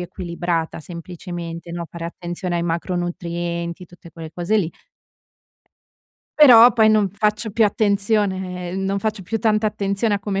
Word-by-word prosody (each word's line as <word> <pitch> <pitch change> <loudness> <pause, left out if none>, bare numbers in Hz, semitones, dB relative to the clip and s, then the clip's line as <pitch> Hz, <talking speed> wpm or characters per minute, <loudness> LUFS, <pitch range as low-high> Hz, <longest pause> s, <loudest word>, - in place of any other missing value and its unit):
equilibrata, 170 -2 -3
semplicemente, 170 0 -7
no, 170 0 -4
fare 170 -1 -7
attenzione 175 +1 -4
ai 170 - -1
macronutrienti, 170 0 -3
tutte 175 0 -16
quelle 160 0 -9
cose 180 +5 0
lì 175 -6 0 1.7
però 245 -4 +9
poi 220 -2 +4
non 215 -3 +3
faccio 210 +2 -1
più 220 +2 +3
attenzione 195 -4 0
non 195 +1 -1
faccio 215 -2 -2
più 225 +5 -2
tanta 215 -1 +2
attenzione 205 +1 0
a 200 - -2
come 195 -1 -2
185 Hz, 140 wpm, -21 LUFS, 170-210 Hz, 1.7 s, però